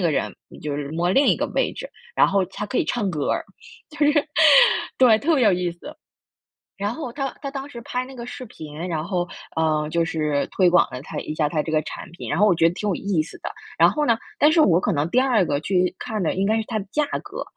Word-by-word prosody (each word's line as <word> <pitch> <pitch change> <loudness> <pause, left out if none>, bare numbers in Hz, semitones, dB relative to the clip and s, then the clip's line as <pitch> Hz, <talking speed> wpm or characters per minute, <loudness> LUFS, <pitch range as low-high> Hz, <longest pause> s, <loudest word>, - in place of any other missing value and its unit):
个 170 - +2
人 145 - -1
你 - - -14
就 150 -1 -4
是 145 -1 -5
摸 170 +3 -1
另 280 +5 +4
一 - - +4
个 - - -1
位 - - +1
置， - - -7 0.3
然 - - +6
后 195 -1 +2
它 210 +3 -6
可 250 - -4
以 - - +2
唱 225 -5 -1
歌 155 -6 -1
儿， - - -1 0.4
就 305 - -14
是 295 0 +4 0.9
对， 240 -4 +6
特 320 +2 +2
别 260 - +3
有 205 - +5
意 180 -1 0
思。 230 - -11 0.8
然 205 +2 -2
后 255 -3 -6
他 270 +1 -4
他 275 - -4
当 275 0 -6
时 235 -4 -9
拍 250 +2 -3
那 265 - -12
个 240 -1 -8
视 255 +1 -7
频， 155 -3 -8
然 160 -3 -2
后， 175 -1 -2 0.3
嗯， 155 -1 +1
就 165 +1 +1
是 150 -4 -1
推 185 -2 +5
广 175 -6 +4
了 125 - -6
他 - - -8
一 - - -5
下 155 -1 0
他 155 -2 -1
这 160 - -5
个 155 -1 +2
产 - - -8
品， 175 - -8
然 - - 0
后 210 - +5
我 205 - +5
觉 165 0 +3
得 170 - -6
挺 210 - -3
有 200 - +1
意 190 -6 0
思 - - -12
的。 - - -5 0.3
然 - - +7
后 300 -1 -1
呢， 230 - +4 0.2
但 295 - +5
是 320 0 +4
我 175 - +4
可 - - 0
能 150 +2 -1
第 250 - +3
二 255 -6 +3
个 145 -4 -1
去 180 +2 0
看 220 -4 -4
的 165 - 0
应 190 +1 0
该 220 +2 +2
是 225 - -1
它 220 - -2
的 195 - -4
价 300 - +1 0.2
格， - - -6
190 Hz, 290 characters per minute, -23 LUFS, 160-245 Hz, 0.9 s, 然